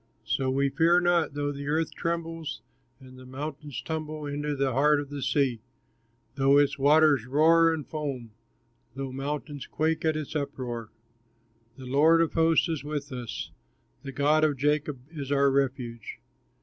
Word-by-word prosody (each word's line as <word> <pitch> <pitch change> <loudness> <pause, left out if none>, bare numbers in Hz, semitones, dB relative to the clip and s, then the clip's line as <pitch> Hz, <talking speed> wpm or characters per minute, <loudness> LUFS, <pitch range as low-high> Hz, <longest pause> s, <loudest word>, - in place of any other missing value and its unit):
So 130 +3 0
we 140 +1 +1
fear 170 +4 +4
not, 175 -4 +1
though 145 0 -1
the 140 0 -7
earth 155 +2 0
trembles, 165 -6 -4 0.4
And 130 -1 -14
mountains 145 +1 -6
tumble 155 -1 -4
into 145 +1 -3
the 135 -2 0
heart 145 +3 +4
of 145 -1 -7
the 145 -1 -5
sea; 130 -4 0 0.7
Though 135 +1 +4
its 145 0 +2
waters 145 -3 +4
roar 165 +4 +5
and 160 -3 -3
foam, 140 -7 -5 0.6
Though 135 -1 -5
mountains 145 +1 -5
quake 160 +1 -1
at 160 -1 +1
its 155 0 -6
uproar. 120 -6 -4 0.9
The 130 - -10
Lord 150 +6 +4
of 165 -1 +1
hosts 165 0 +3
is 160 -4 -3
with 145 -1 -5
us, 120 -4 -6 0.5
The 135 - -7
God 150 +3 +2
of 150 -3 +2
Jacob 150 -1 0
is 145 -4 -6
our 140 -1 +3
refuge. 130 -4 -2
145 Hz, 155 wpm, -27 LUFS, 135-155 Hz, 0.9 s, roar